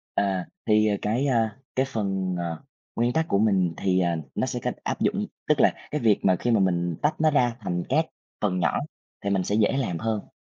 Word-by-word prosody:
À. 95 -2 0 0.2
Thì, 110 0 +4
à, 105 -1 +2
cái, 115 +7 +1
a, 115 -5 +1 0.2
cái 130 +1 +2
phần, 95 -6 -1
ờ, 85 -2 -4 0.3
nguyên 120 +1 +2
tắc 160 0 +1
của 100 - +2
mình 95 -5 +2
thì, 95 -1 +1
à, 85 -1 +1 0.2
nó - - 0
sẽ - - -3
cách - - -1
áp - - -2
dụng, - - +1 0.2
tức - - +3
là - - +6 0.2
cái 150 - -1
việc 110 -4 +4
mà 95 -1 +4
khi 120 - -1
mà 110 -3 +4
mình 85 -3 +1
tách 150 +2 +1
nó 155 0 +5
ra 125 -5 +2
thành 90 -4 -2
các 155 +5 +2 0.3
phần 95 -3 0
nhỏ 80 -4 +1 0.4
thì 100 - -2
mình 95 -1 +2
sẽ 100 - -1
dễ 110 +4 +3
làm 110 -11 -1
hơn. 110 0 -2
105 Hz, 230 wpm, -25 LUFS, 90-120 Hz, 0.4 s, là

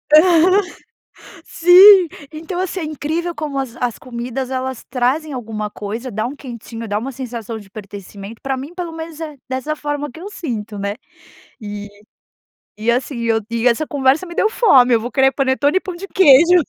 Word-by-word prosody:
Aham. 355 +4 +6 0.8
Sim. 365 +2 +8 0.2
Então, 320 +3 -6
assim, 370 0 -2
é - - -3
incrível 315 +3 -3
como 300 -4 -4
as 265 -4 -3
as 245 -2 -1
comidas 250 +1 -5
elas 260 -1 -3
trazem 275 +5 0
alguma 220 -4 -4
coisa. 220 +5 -6
Dá 215 +2 -2
um 260 +4 -5
quentinho. 235 -4 -8
Dá 205 0 -1
uma 260 +5 -5
sensação 235 -3 -6
de 205 -3 -13
pertencimento. 200 +1 -10
Pra 270 -1 -2
mim, 280 +6 -8
pelo 355 -2 -4
menos, 325 -1 -8
é 305 -3 -6
dessa 260 +4 -2
forma 290 -1 -4
que 320 - -12
eu 385 +4 -7
sinto 225 - -5
né. 200 +1 -3 0.7
E 205 -1 -7 0.9
e 220 +2 -2
assim, 250 +1 -2
eu 225 -1 +1
e 230 +1 0
essa 245 +6 +2
conversa 280 +3 +1
me 345 -1 -9
deu 430 - +2
fome. 265 - +5
Eu 230 - +3
vou 240 +2 -5
querer 270 -1 +4
panetone 275 +3 +1
e - - +3
pão 370 -2 -6
de 385 +3 -8
queijo 345 0 +6
265 Hz, 185 wpm, -19 LUFS, 230-320 Hz, 0.9 s, Sim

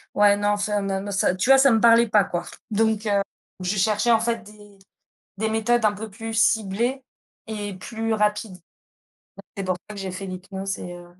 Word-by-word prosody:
Ouais, 205 0 +5
non, 205 0 0
enfin 205 0 0
mais 195 -1 -2
me 205 +1 -6
ça, 190 -2 +2
tu 185 +7 -1
vois, 270 - +8
ça 275 0 +6
me 225 -1 +3
parlait 235 0 +6
pas 210 -1 +5
quoi. 175 -3 -4 0.3
Donc, 220 0 +1
heu, 200 -1 +2 0.4
je 185 +3 -1
cherchais 215 +4 +2
en 225 - +5
fait 230 0 -1
des 205 -1 -16 0.6
des 220 +1 0
méthodes 225 +2 +1
un 215 - +5
peu 215 +2 -7
plus 225 +2 -7
ciblées 225 +4 +1 0.5
et 205 -2 -5
plus 225 +3 -3
rapides 210 -2 -1
et 175 - -31 0.8
c'est 195 - -2
pour 185 0 0
ça 210 - -8
que 200 - -7
j'ai 190 -1 -4
fait 195 +2 -6
l'hypnose 190 +1 -5
et 180 - -7
heu 175 0 -11
210 Hz, 210 wpm, -23 LUFS, 195-225 Hz, 0.8 s, vois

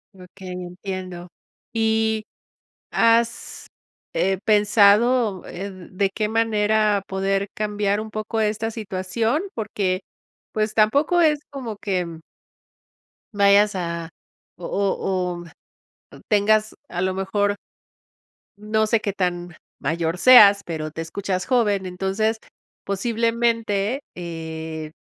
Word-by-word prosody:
Okey, 185 0 -11
entiendo. 180 0 -6 0.4
Y, 220 -1 +1 0.6
¿has, 230 0 +1 0.5
eh, 190 0 +1
pensado, 210 0 +4
eh, 195 +3 -6 0.2
de 195 +1 +1
qué 215 0 -2
manera 215 -2 +2
poder 195 +1 -1
cambiar 205 -1 -1
un 220 0 -5
poco 215 +1 -3
esta 220 +1 0
situación? 220 - -2
Porque, 200 -4 -1 0.5
pues, 215 0 0
tampoco 280 +11 +3
es 305 -3 +4
como 255 -6 -5
que, 190 -3 -2
mm 165 -1 -9 1.1
vayas 200 +1 +5
a 170 -2 -4 0.5
o 175 - -8
o 185 -3 -1 0.7
o - - -13
tengas, 215 +1 +3 0.2
a 175 - -3
lo 185 0 0
mejor 205 +2 0 1.0
no 215 +1 0
sé 225 0 +2
qué 200 -2 -3
tan 175 -3 -2 0.2
mayor 165 +4 -1
seas, 205 -4 +8
pero 155 -2 -4
te 160 - -5
escuchas 185 +3 -3
joven. 210 -7 +1
Entonces, 195 +5 -1 0.5
posiblemente, 230 +2 0
eh, 160 -2 -6
200 Hz, 110 wpm, -22 LUFS, 185-220 Hz, 1.1 s, seas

